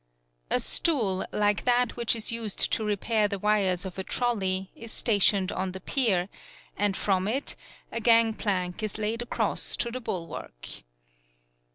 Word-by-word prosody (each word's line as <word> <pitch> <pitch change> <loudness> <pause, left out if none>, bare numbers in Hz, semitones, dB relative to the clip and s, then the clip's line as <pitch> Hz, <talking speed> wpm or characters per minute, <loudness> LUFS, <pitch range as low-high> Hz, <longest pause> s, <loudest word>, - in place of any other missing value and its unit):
A - - +3
stool, 220 - +1
like 205 -1 +1
that 245 0 +2
which 235 -1 +1
is 225 0 0
used 230 -3 +1
to 220 - +1
repair 210 +1 +1
the 200 -1 -3
wires 195 -3 +1
of 190 0 -6
a - - -1
trolley, 190 -6 -1
is 230 -1 -9
stationed 200 -3 +2
on 185 -1 -3
the 190 - -6
pier, 190 -5 +1 0.5
and 205 -1 0
from 190 -1 +1
it 265 +6 -1 0.4
a 230 - -3
gangplank 220 -5 +2
is 215 -1 -3
laid 220 +2 -1
across 240 - -1
to 235 - 0
the 255 +2 -5
bulwark. 165 - -6
210 Hz, 155 wpm, -27 LUFS, 190-230 Hz, 0.5 s, A